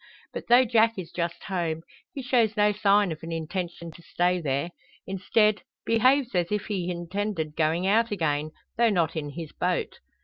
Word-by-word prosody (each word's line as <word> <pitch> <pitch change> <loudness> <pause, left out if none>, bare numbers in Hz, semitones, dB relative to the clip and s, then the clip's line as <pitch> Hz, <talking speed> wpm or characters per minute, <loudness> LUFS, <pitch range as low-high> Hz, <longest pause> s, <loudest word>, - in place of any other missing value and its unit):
But - - -6
though 245 +2 +6
Jack 225 -1 +3
is 175 -3 -6
just 170 -1 -3
home, 170 -4 -2 0.3
he 275 - -6
shows 235 -4 +2
no 210 0 +4
sign 205 -2 +3
of 155 - -6
an 165 0 -7
intention 170 +1 -4
to 170 - -15
stay 180 +1 0
there; 140 +3 -1 0.3
instead, 205 +2 +1 0.2
behaves 255 +3 +3
as 175 -1 0
if 210 -1 -1
he 185 -4 -3
intended 175 -2 -3
going 165 +3 +1
out 225 +4 +3
again, 155 -6 -1 0.3
though 235 0 +4
not 170 -6 +1
in 150 -2 -3
his 160 +1 -7
boat. - - -2
180 Hz, 175 wpm, -26 LUFS, 165-215 Hz, 0.3 s, though